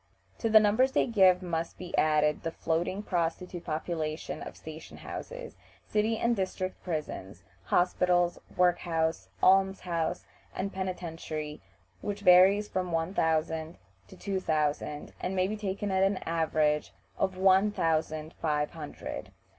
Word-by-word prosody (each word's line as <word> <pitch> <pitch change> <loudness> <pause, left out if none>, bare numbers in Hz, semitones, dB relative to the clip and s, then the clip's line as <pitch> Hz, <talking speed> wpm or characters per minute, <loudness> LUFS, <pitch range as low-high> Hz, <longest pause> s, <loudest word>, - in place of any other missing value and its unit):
To 225 - 0
the 220 0 +8
numbers 220 +6 +3
they - - +3
give 190 -6 +4
must 165 -2 -3
be 180 -1 -5
added 150 -1 +3
the 165 - -2
floating 170 +5 -1
prostitute 175 -1 -2
population 155 -1 -3
of - - -8
station 160 0 -10
houses, - - -7 0.3
city 215 +1 +1
and 235 +1 +2
district 185 -1 -3
prisons, 155 - -5 0.2
hospitals, 175 0 +2 0.2
work 180 -1 +4
house, 160 - -1
alms 190 0 +5
house, 170 -3 -2 0.3
and 195 +1 -3
penitentiary, 165 -5 -4 0.4
which 205 0 -4
varies 195 +2 +6
from 185 -3 -2
one 165 +2 -1
thousand 160 -1 0 0.3
to - - -14
two 195 -2 -2
thousand, 150 -3 -1
and 185 +1 -2
may 185 0 +2
be 215 - -2
taken 205 -1 -3
at 190 0 +2
an 195 0 +3
average 155 -2 +1 0.3
of 190 -1 0
one 190 +2 +5
thousand 160 -4 -1
five 150 -2 0
hundred. 155 -3 -7
180 Hz, 140 wpm, -29 LUFS, 160-195 Hz, 0.4 s, the